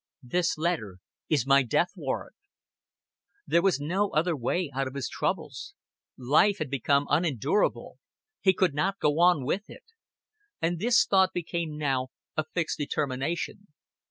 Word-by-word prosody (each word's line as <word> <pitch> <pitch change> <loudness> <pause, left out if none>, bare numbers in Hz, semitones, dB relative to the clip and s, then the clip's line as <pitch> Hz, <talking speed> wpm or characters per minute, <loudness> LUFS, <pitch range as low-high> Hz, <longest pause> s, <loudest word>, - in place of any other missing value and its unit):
This 170 +7 0
letter 155 - -2 0.3
is 145 -6 +2
my 140 0 +5
death 125 - +1
warrant." - - -4 1.1
There 170 +4 +3
was 185 -5 +2
no 185 +8 0
other 165 +1 +1
way 145 +5 -1
out 135 +1 -1
of 130 - -8
his 140 -3 -2
troubles. - - -3 0.4
Life 150 +11 +3
had 150 -4 -4
become 140 +1 +2
unendurable; 160 - 0 0.4
he 190 - +4
could 185 -4 +2
not 190 +7 0
go 150 -3 +1
on 175 -6 +4
with 200 - -2
it. - - -12 0.8
And 170 +1 -1
this 230 +4 +4
thought 190 -1 +3
became 170 -3 -3
now 135 -4 0 0.3
a 155 - +1
fixed 165 +1 -3
determination. 145 +7 -3
155 Hz, 145 wpm, -27 LUFS, 140-180 Hz, 1.1 s, my